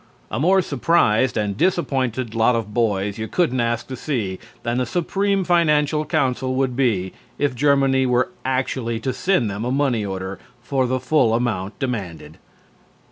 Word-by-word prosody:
A - - -2
more 185 +5 +4
surprised 130 -6 +2
and 105 -2 -1
disappointed 130 - 0
lot 115 +1 +3
of 110 -2 -3
boys 105 -3 0
you 110 - -3
couldn't 130 -6 0
ask 115 -1 0
to 130 - -6
see 115 -9 -3 0.2
than 120 +1 -1
the 125 - 0
Supreme 195 +5 0
Financial 155 -3 +2
Council 130 -2 0
would 130 -2 0
be 105 -9 0 0.2
if 145 -2 0
Germany 135 0 +3
were 125 +6 +2
actually 130 -3 -1
to 130 +3 -2
send 185 - +1
them 100 +2 -4
a 125 - -1
money 135 -5 +1
order 95 -1 -5 0.2
for 130 0 0
the 130 +1 0
full 130 -4 +2
amount 110 -5 -2
demanded. 105 - -5
125 Hz, 160 wpm, -21 LUFS, 110-140 Hz, 0.2 s, more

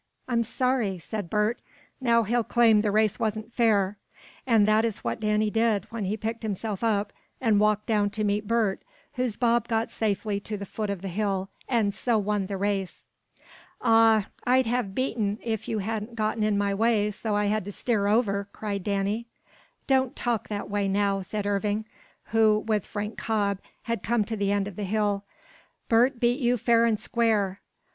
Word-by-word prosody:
"I'm 235 -2 +1
sorry!" 235 -4 0
said 200 +1 -5
Bert. 210 +4 0 0.4
"Now 235 -2 +3
he'll 235 +3 +1
claim 225 -2 +4
the 210 - 0
race 215 +1 +2
wasn't 220 0 -2
fair." 210 -4 +2 0.5
And 220 -4 +4
that 215 +1 +4
is 225 -3 -2
what - - -2
Danny 210 0 +1
did 225 -3 +1
when 230 -3 -3
he 205 +3 -1
picked 225 +2 -4
himself 215 -1 -3
up, 205 -2 0 0.3
and 220 -5 +3
walked 210 0 +2
down 210 -2 +2
to 215 - 0
meet 205 0 0
Bert, 220 -4 +1 0.3
whose 250 -4 -2
bob 235 -1 +2
got 225 -1 0
safely 205 -1 -1
to 210 +1 -5
the 200 - -6
foot 210 +2 -4
of 200 -2 -4
the - - -3
hill, 195 0 -1 0.2
and 220 -5 +2
so 235 +1 +1
won 205 -2 -1
the 200 -1 -3
race. 195 -1 -2 0.8
"Aw, 225 -3 +5 0.2
I'd 255 +1 +3
have 225 -4 -1
beaten 225 -6 -1
if 220 -3 -3
you 220 - -1
hadn't 215 +2 -3
gotten 220 0 -1
in 210 -1 +2
my 200 0 +1
way 210 0 +2
so 210 +1 -3
I 205 0 +1
had 215 0 0
to 205 - -5
steer 205 -1 0
over," 205 -2 +1
cried 200 -3 -4
Danny. 200 +4 -1 0.6
"Don't 265 -2 +2
talk 235 -3 -1
that 205 -1 -4
way 200 -1 -1
now," 195 0 +1
said 205 +2 -4
Irving, 205 +1 0 0.5
who, 220 -1 +4
with 210 -3 0
Frank 210 0 -5
Cobb 200 -3 0 0.2
had 230 -3 -2
come 230 0 +1
to 225 - -3
the 200 -1 0
end 200 -1 +1
of 205 - -9
the 210 - -3
hill. 205 0 0 0.6
"Bert 240 +3 +3
beat 240 +3 +2
you 245 -2 +2
fair 230 +1 +3
and 220 -2 +1
square." 210 -5 0
215 Hz, 185 wpm, -26 LUFS, 200-230 Hz, 0.8 s, Aw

